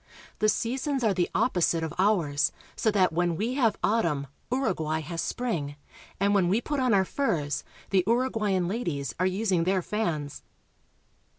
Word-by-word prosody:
The 215 - +3
seasons 260 +5 -1
are 215 -3 +3
the 175 -2 0
op 255 - +2
posite 170 -2 +2
of 160 - -3
ours, 175 -8 +2 0.2
so 220 - +1
that 190 -5 +3
when 175 0 +1
we 225 +8 -1
have 235 -6 +2
autumn 170 -11 +1 0.3
Uruguay 170 - 0
has 165 +2 -4
spring, 165 - -2 0.4
and 200 +1 +2
when 195 -3 +3
we 205 +5 +3
put 290 +3 -2
on 255 -2 +2
our 195 -2 +4
furs 175 - -1 0.3
the 190 -2 +4
Uruguayan 220 -7 +1
ladies 165 - -2
are 185 - +3
using 185 -2 +1
their 185 +1 +1
fans. 165 -10 -2
190 Hz, 165 wpm, -27 LUFS, 165-225 Hz, 0.4 s, our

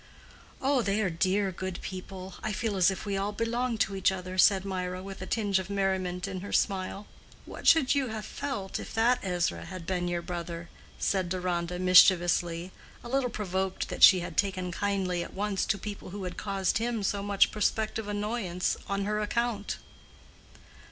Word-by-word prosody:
"Oh, 270 -1 +3
they 200 -1 0
are 185 - 0
dear 190 +4 +1
good 185 0 -5
people; 185 0 -7
I 220 - -2
feel 215 0 -1
as 185 -1 +5
if 190 - -4
we 200 -1 -1
all 200 +1 -1
belonged 230 +2 -1
to 195 - +1
each 190 0 +3
other," 185 -1 -5
said 195 0 +5
Mirah, 185 -1 -3
with 195 -1 -8
a 185 - -5
tinge 205 -4 +1
of 190 0 -6
merriment 190 -2 -1
in 190 -1 -4
her 200 - -7
smile. 195 0 0 0.4
"What - - -7
should 305 -6 +6
you 280 -2 +1
have 220 -2 -5
felt 205 -9 -4
if - - -8
that 235 +3 +3
Ezra 180 -2 -1
had 185 -3 -8
been 180 -1 -1
your 175 -1 -2
brother?" 170 -1 -5 0.3
said 185 -3 0
Deronda, 180 -1 -2
mischievously—a 180 +1 +3
little 265 -1 +1
provoked 190 -3 -2
that - - -6
she 185 -2 +9
had 175 -1 -7
taken 185 -3 0
kindly 185 -2 -1
at - - -10
once 200 0 -1
to 195 +3 +1
people 205 -2 -7
who 200 +1 -6
had 180 -1 -4
caused 195 -1 0
him 230 -2 -1
so 200 +1 0
much 200 -1 +3
prospective 215 0 -1
annoyance 205 -3 -1
on 200 0 -1
her 210 +1 0
account. 215 0 -1
195 Hz, 180 wpm, -29 LUFS, 180-210 Hz, 0.4 s, she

